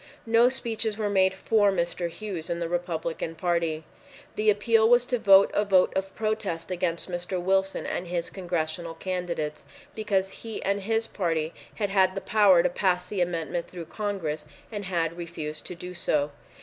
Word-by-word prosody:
No 230 Hz, +2 st, +5 dB
speeches 225 Hz, -4 st, -2 dB
were 210 Hz, -2 st, -1 dB
made 190 Hz, -1 st, +3 dB
for 205 Hz, 0 st, +3 dB
Mr. 175 Hz, -1 st, -1 dB
Hughes 185 Hz, -3 st, -6 dB
and 170 Hz, -, -1 dB
the 170 Hz, -, -2 dB
Republican 165 Hz, -1 st, -3 dB
Party. 165 Hz, -2 st, 0 dB, 0.5 s
The 215 Hz, 0 st, +2 dB
appeal 220 Hz, +2 st, +4 dB
was 245 Hz, 0 st, +5 dB
to 245 Hz, -1 st, -1 dB
vote 195 Hz, -1 st, +7 dB
a 205 Hz, -, +2 dB
vote 190 Hz, -3 st, +4 dB
of 190 Hz, 0 st, -2 dB
protest 215 Hz, -6 st, -2 dB
against 175 Hz, -2 st, -1 dB
Mr. 180 Hz, +1 st, -3 dB
Wilson 190 Hz, +2 st, +1 dB
and 175 Hz, -, -3 dB
his 170 Hz, -1 st, -2 dB
Congressional 170 Hz, -2 st, -3 dB
candidates, 175 Hz, -4 st, -3 dB, 0.3 s
because 195 Hz, -3 st, 0 dB
he 225 Hz, -2 st, -7 dB
and 200 Hz, +1 st, 0 dB
his 225 Hz, +3 st, 0 dB
party 165 Hz, -6 st, -1 dB, 0.2 s
had 205 Hz, -3 st, -2 dB
had 190 Hz, -1 st, +3 dB
the -, -, -1 dB
power 200 Hz, -5 st, +5 dB
to -, -, +3 dB
pass 180 Hz, 0 st, +1 dB
the 190 Hz, -1 st, -2 dB
amendment 170 Hz, -1 st, -2 dB
through 175 Hz, -2 st, -7 dB
Congress 165 Hz, -8 st, -3 dB, 0.2 s
and 205 Hz, -2 st, -5 dB
had 170 Hz, -2 st, -1 dB
refused 160 Hz, -3 st, -6 dB
to 180 Hz, -, -6 dB
do 180 Hz, +1 st, -8 dB
so. 150 Hz, -4 st, 0 dB
185 Hz, 175 wpm, -27 LUFS, 170-205 Hz, 0.5 s, vote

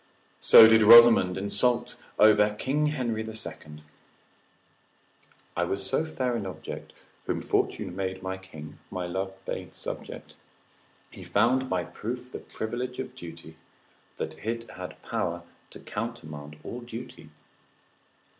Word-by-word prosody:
So 110 Hz, -, +9 dB
did 110 Hz, 0 st, +6 dB
Rosamond 115 Hz, -4 st, +8 dB
insult 120 Hz, +5 st, +2 dB, 0.2 s
over 105 Hz, 0 st, +5 dB
King 145 Hz, +7 st, 0 dB
Henry 125 Hz, -7 st, -2 dB
the 110 Hz, 0 st, -6 dB
Second. 75 Hz, -8 st, -7 dB, 1.7 s
———I 90 Hz, -, +1 dB
was 95 Hz, +2 st, -3 dB
so 155 Hz, -, 0 dB
fair 130 Hz, -6 st, -2 dB
an 105 Hz, -4 st, -3 dB
object; 95 Hz, -, -8 dB, 0.3 s
Whom -, -, -1 dB
fortune 90 Hz, -, -1 dB
made 95 Hz, -1 st, -4 dB
my 95 Hz, 0 st, -3 dB
king, 80 Hz, -5 st, -11 dB
my 90 Hz, -1 st, -4 dB
love 95 Hz, +2 st, -4 dB
made -, -, -5 dB
subject; -, -, -7 dB, 0.8 s
He -, -, -12 dB
found 130 Hz, +5 st, +2 dB
by 90 Hz, -1 st, 0 dB
proof 125 Hz, +8 st, -6 dB
the -, -, -6 dB
privilege 125 Hz, +3 st, -5 dB
of 130 Hz, -, -5 dB
beauty, 80 Hz, -1 st, -11 dB, 0.6 s
That -, -, -5 dB
it 115 Hz, +1 st, -4 dB
had 90 Hz, 0 st, -9 dB
power 85 Hz, 0 st, -3 dB, 0.3 s
to -, -, -12 dB
countermand 80 Hz, -10 st, -6 dB
all 125 Hz, -, -6 dB
duty. 120 Hz, 0 st, -9 dB
105 Hz, 130 wpm, -27 LUFS, 90-120 Hz, 1.7 s, So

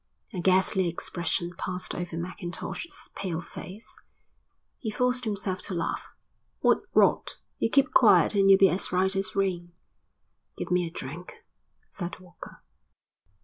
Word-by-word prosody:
A 185 Hz, -, -3 dB
ghastly 185 Hz, +1 st, +3 dB
expression 170 Hz, +1 st, -2 dB
passed 185 Hz, 0 st, -3 dB
over 175 Hz, -1 st, -4 dB
Mackintosh's 175 Hz, -, -6 dB
pale 180 Hz, -5 st, -3 dB
face. 190 Hz, +4 st, -9 dB, 0.8 s
He 220 Hz, -, -3 dB
forced 250 Hz, +3 st, +1 dB
himself 200 Hz, -3 st, -2 dB
to 190 Hz, -, -3 dB
laugh. 170 Hz, -, -2 dB, 0.5 s
"What -, -, +4 dB, 0.2 s
rot! -, -, +3 dB, 0.2 s
You -, -, +1 dB
keep 280 Hz, +4 st, +3 dB
quiet -, -, +6 dB
and 195 Hz, -1 st, +4 dB
you'll 195 Hz, -, +9 dB
be 195 Hz, 0 st, +6 dB
as 180 Hz, -, 0 dB
right 190 Hz, +2 st, +2 dB
as 195 Hz, 0 st, -2 dB
rain." 180 Hz, -3 st, -1 dB, 0.8 s
"Give -, -, -5 dB
me 180 Hz, -1 st, +2 dB
a -, -, -5 dB
drink," 170 Hz, -, -8 dB, 0.5 s
said 180 Hz, -2 st, -5 dB
Walker. 180 Hz, -2 st, -13 dB
185 Hz, 140 wpm, -27 LUFS, 175-195 Hz, 0.8 s, you'll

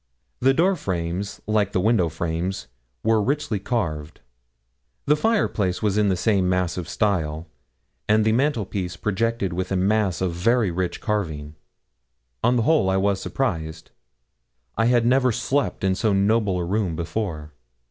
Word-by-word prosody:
The 135 Hz, +2 st, +3 dB
door 185 Hz, +5 st, +3 dB
frames, 95 Hz, -, -3 dB
like 105 Hz, -2 st, +1 dB
the -, -, +2 dB
window 95 Hz, -3 st, +2 dB
frames, 85 Hz, +4 st, -3 dB, 0.4 s
were 110 Hz, -1 st, +3 dB
richly 125 Hz, -3 st, -1 dB
carved; 80 Hz, -9 st, -3 dB, 0.9 s
the 150 Hz, -, +4 dB
fireplace 150 Hz, -, 0 dB
was 105 Hz, -2 st, +1 dB
in 105 Hz, -1 st, +3 dB
the 95 Hz, -, +2 dB
same 95 Hz, -1 st, +2 dB
massive 90 Hz, -1 st, -1 dB
style, 80 Hz, -6 st, -1 dB, 0.6 s
and 110 Hz, 0 st, +4 dB
the 110 Hz, -, +3 dB
mantelpiece 110 Hz, -8 st, -1 dB
projected 105 Hz, -2 st, -1 dB
with 95 Hz, +2 st, -3 dB
a -, -, +1 dB
mass 100 Hz, -1 st, +1 dB
of 95 Hz, -2 st, -1 dB
very 110 Hz, +3 st, +2 dB
rich 90 Hz, +1 st, -3 dB
carving. 80 Hz, -9 st, -3 dB, 0.9 s
On 120 Hz, +2 st, +3 dB
the 120 Hz, -, +2 dB
whole 150 Hz, -8 st, +3 dB
I 95 Hz, -, +2 dB
was 100 Hz, 0 st, +1 dB
surprised. 80 Hz, -11 st, -3 dB, 0.8 s
I 115 Hz, -, +1 dB
had 120 Hz, -1 st, +3 dB
never 130 Hz, +1 st, +3 dB
slept 140 Hz, +2 st, -1 dB
in 95 Hz, -1 st, +2 dB
so 105 Hz, +2 st, +1 dB
noble 100 Hz, -1 st, +2 dB
a 90 Hz, -, -2 dB
room 95 Hz, -2 st, -1 dB
before. 85 Hz, -2 st, -4 dB
100 Hz, 150 wpm, -23 LUFS, 90-115 Hz, 0.9 s, the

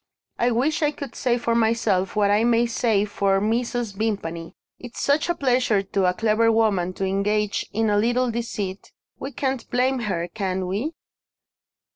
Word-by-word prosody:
I 240 Hz, -, +3 dB
wish 265 Hz, +7 st, 0 dB
I 300 Hz, -, +3 dB
could 280 Hz, -3 st, -7 dB
say 245 Hz, -2 st, 0 dB
for 235 Hz, -1 st, -1 dB
myself 220 Hz, -5 st, +1 dB
what 205 Hz, -1 st, +3 dB
I 210 Hz, +2 st, +3 dB
may 235 Hz, 0 st, +3 dB
say 225 Hz, -3 st, +1 dB
for 200 Hz, -1 st, +1 dB
Mrs. 235 Hz, +1 st, -1 dB
Vimpany. 195 Hz, -6 st, -3 dB, 0.2 s
It's 245 Hz, -1 st, -9 dB
such 290 Hz, +4 st, +1 dB
a 345 Hz, -, +1 dB
pleasure 250 Hz, -8 st, +2 dB
to 195 Hz, 0 st, 0 dB
a 180 Hz, -, +3 dB
clever 225 Hz, +1 st, +2 dB
woman 200 Hz, -5 st, +1 dB
to 195 Hz, -, -3 dB
engage 205 Hz, +2 st, 0 dB
in 220 Hz, 0 st, +1 dB
a 205 Hz, -, +3 dB
little 240 Hz, +3 st, +1 dB
deceit 210 Hz, -4 st, -5 dB, 0.3 s
we 270 Hz, -, -5 dB
can't 265 Hz, -3 st, -3 dB
blame 255 Hz, +1 st, +1 dB
her, 170 Hz, -2 st, -1 dB
can 190 Hz, -1 st, -3 dB
we?" 215 Hz, -, -3 dB
225 Hz, 170 wpm, -23 LUFS, 200-245 Hz, 0.3 s, I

